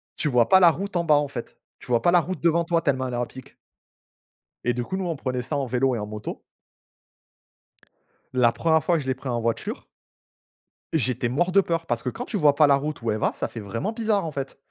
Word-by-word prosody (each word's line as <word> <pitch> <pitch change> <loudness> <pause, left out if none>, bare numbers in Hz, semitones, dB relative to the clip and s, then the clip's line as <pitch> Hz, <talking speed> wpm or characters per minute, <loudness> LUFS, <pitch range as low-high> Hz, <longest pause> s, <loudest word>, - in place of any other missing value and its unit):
tu - - -1
vois 125 -3 +3
pas 190 - +6
la 175 -2 +8
route 200 +4 -6
en 170 - +2
bas, 155 -3 +4
en 145 0 +2
fait. 125 -4 -8 0.2
Tu - - -14
vois 120 -2 +2
pas 175 - +3
la 175 -1 +5
route 175 +1 -5
devant 170 +1 +3
toi 170 0 +1
tellement 130 -5 0
elle 125 - -5
est - - -2
à 120 - 0
pic 130 +1 -13 1.1
et 120 - +1
du 120 +1 -2
coup, 190 - -4
nous, 190 -1 -2
on 165 -2 -2
prenait 130 -2 -3
ça 140 +5 -3
en 140 -2 -1
vélo 130 +1 +1
et - - -2
en 105 - -4
moto. 105 0 -7 1.9
La 125 -2 +4
1re 160 +2 +2
fois 175 - +2
que 155 - -2
je 130 - -8
l'ai 130 - +1
pris 130 +1 -8
en 120 -1 -1
voiture. 115 0 -3 1.1
J'étais 125 -4 +1
mort 175 +8 0
de 195 +1 +5
peur, 165 -2 -2
parce 120 -5 -1
que 125 - -2
quand 245 - -6
tu 220 - -3
vois 150 -6 +4
pas 150 +1 +5
la 140 - +5
route 150 +2 -2
où 115 - -1
elle 105 - 0
va, - - +1
ça - - -3
fait 115 - -8
vraiment 115 - -3
bizarre, 215 -5 0
en 155 - -5
fait. 135 -1 -5
140 Hz, 255 wpm, -24 LUFS, 125-170 Hz, 1.9 s, la